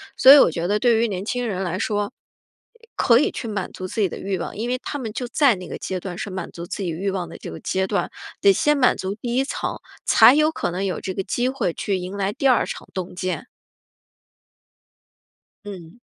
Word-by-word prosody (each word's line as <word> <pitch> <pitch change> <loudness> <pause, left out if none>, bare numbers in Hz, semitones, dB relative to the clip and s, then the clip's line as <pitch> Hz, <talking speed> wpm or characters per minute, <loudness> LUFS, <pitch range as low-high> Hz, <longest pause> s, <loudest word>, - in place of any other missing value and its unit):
所 265 - +8
以 290 - +11
我 - - +6
觉 165 +1 -3
得 210 - +2
对 235 -2 +4
于 230 -1 +1
年 190 0 -4
轻 245 +2 -2
人 195 -4 -2
来 185 -1 -2
说， 205 +3 -1 0.8
可 235 0 +5
以 - - +1
去 230 - -5
满 195 -3 -3
足 185 - -6
自 200 - -5
己 200 - +3
的 - - -7
欲 195 -1 -3
望， - - -5
因 230 +4 -3
为 255 - 0
他 290 - -4
们 230 -5 -5
就 245 +3 -4
在 265 -2 +3
那 180 -1 -9
个 - - -6
阶 185 -1 -4
段 175 -1 -6
是 200 - -4
满 185 -1 -5
足 170 - -8
自 190 - -6
己 180 - -2
欲 190 +4 -2
望 180 -3 -3
的 - - -10
这 - - -8
个 80 - -8
阶 190 0 -1
段， 200 +1 -1 0.3
得 200 - +6
先 295 +9 +2
满 255 -2 +4
足 190 +1 -3
第 235 +3 -4
1 265 - +3
层， 275 - -3 0.3
才 - - +7
有 305 +1 +4
可 175 - -2
能 190 +3 -2
有 185 - -3
这 185 - -4
个 195 - -2
机 245 +6 -1
会 235 -11 -1
去 195 -2 -2
迎 180 +2 -6
来 200 0 -1
第 270 +5 0
2 255 - +4
场 - - -7
洞 185 -2 -5
见。 185 +6 -4 2.2
嗯。 195 +1 -10
200 Hz, 250 characters per minute, -22 LUFS, 185-240 Hz, 2.2 s, 以